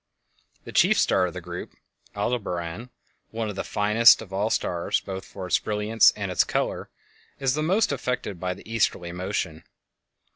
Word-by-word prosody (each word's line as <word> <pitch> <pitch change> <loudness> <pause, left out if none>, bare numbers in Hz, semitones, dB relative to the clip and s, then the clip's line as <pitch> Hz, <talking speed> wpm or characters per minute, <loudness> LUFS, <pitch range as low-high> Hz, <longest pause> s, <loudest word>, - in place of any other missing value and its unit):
The - - -9
chief - - +4
star 90 - +3
of 90 - -8
the 90 - -5
group, 90 +1 -8 0.4
Aldebaran, 100 -1 -3 0.4
one 110 -1 -3
of - - -9
the - - -3
finest 105 +3 +5
of 95 - -13
all 100 +3 0
stars 85 -5 0
both 95 0 -6
for 95 -2 -8
its 90 - +2
brilliance 105 +1 +3
and 100 -3 -4
its 90 - +3
color, - - -2 0.5
is 135 -2 +1
the 155 - -1
most 185 +6 +2
affected 125 -8 -3
by 90 0 -2
the - - -15
easterly 100 -6 0
motion. 90 -3 -3
100 Hz, 170 wpm, -25 LUFS, 90-115 Hz, 0.5 s, finest